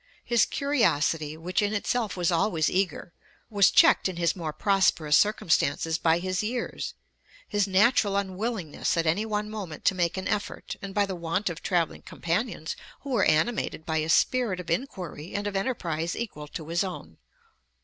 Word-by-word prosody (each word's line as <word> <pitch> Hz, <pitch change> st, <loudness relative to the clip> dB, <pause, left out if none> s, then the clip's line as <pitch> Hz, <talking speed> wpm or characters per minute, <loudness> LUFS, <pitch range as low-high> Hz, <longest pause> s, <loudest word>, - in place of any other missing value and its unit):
His 235 Hz, -2 st, +3 dB
curiosity, 160 Hz, -, +1 dB
which 180 Hz, +5 st, -1 dB
in 205 Hz, +1 st, 0 dB
itself 220 Hz, 0 st, -1 dB
was 175 Hz, -1 st, +1 dB
always 170 Hz, -2 st, +1 dB
eager, 185 Hz, -2 st, -1 dB, 0.4 s
was 200 Hz, -3 st, +5 dB
checked -, -, +5 dB
in 185 Hz, -, -6 dB
his 170 Hz, -1 st, +1 dB
more 165 Hz, -4 st, -4 dB
prosperous 170 Hz, -5 st, +2 dB
circumstances 165 Hz, -6 st, +2 dB
by 165 Hz, 0 st, +3 dB
his 185 Hz, +1 st, -1 dB
years, 235 Hz, +3 st, -3 dB, 0.5 s
his 205 Hz, -1 st, +1 dB
natural 200 Hz, +1 st, +3 dB
unwillingness 195 Hz, -4 st, -2 dB
at 165 Hz, -, +1 dB
any 190 Hz, +8 st, +1 dB
one 210 Hz, -1 st, -1 dB
moment 200 Hz, -8 st, -7 dB
to -, -, +5 dB
make 175 Hz, -1 st, 0 dB
an 190 Hz, -, -3 dB
effort, 205 Hz, -1 st, -3 dB
and 200 Hz, -1 st, -7 dB
by 205 Hz, -1 st, +3 dB
the 195 Hz, -, -4 dB
want 170 Hz, +3 st, -1 dB
of 165 Hz, -, -8 dB
travelling 175 Hz, -3 st, 0 dB
companions 170 Hz, -1 st, -3 dB, 0.3 s
who 280 Hz, -, -7 dB
were 225 Hz, -6 st, +3 dB
animated 160 Hz, 0 st, +1 dB
by 160 Hz, -1 st, -1 dB
a 155 Hz, +1 st, -1 dB
spirit 225 Hz, +1 st, +2 dB
of 170 Hz, -2 st, -6 dB
inquiry 175 Hz, -, -4 dB
and 205 Hz, 0 st, -2 dB
of 205 Hz, -1 st, -3 dB
enterprise 170 Hz, -7 st, -2 dB
equal 150 Hz, -11 st, -5 dB
to 155 Hz, +1 st, -8 dB
his 170 Hz, +3 st, +1 dB
own. 85 Hz, -, -7 dB
185 Hz, 170 wpm, -27 LUFS, 165-210 Hz, 0.5 s, was